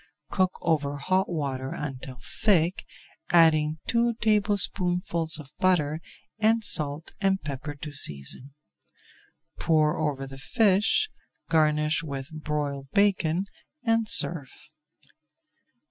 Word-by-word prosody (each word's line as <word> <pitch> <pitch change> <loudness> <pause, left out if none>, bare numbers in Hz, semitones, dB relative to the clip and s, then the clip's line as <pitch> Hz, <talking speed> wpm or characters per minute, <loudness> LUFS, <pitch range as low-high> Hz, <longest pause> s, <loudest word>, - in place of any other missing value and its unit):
Cook 185 -1 0
over 145 -4 0
hot 185 +6 0
water 135 -5 -3
until 130 -3 -7 0.2
thick, 185 -4 +2 0.5
adding 160 -2 +4
two 235 0 +1
tablespoonfuls 185 -6 0
of 145 -3 -12
butter 160 -4 +1 0.4
and 220 +1 +2
salt 150 -5 +2
and 195 -1 +1
pepper 145 -1 -6
to 150 +1 -8
season. 125 - +1 1.0
Pour 155 -2 +1
over 145 -3 -2
the 135 0 -11
fish, 210 - +2 0.4
garnish 155 -1 +2
with 140 -2 -7
broiled 150 -3 -4
bacon 190 -4 +2 0.4
and 225 -2 +1
serve. 145 -7 +5
155 Hz, 100 wpm, -26 LUFS, 145-190 Hz, 1.0 s, serve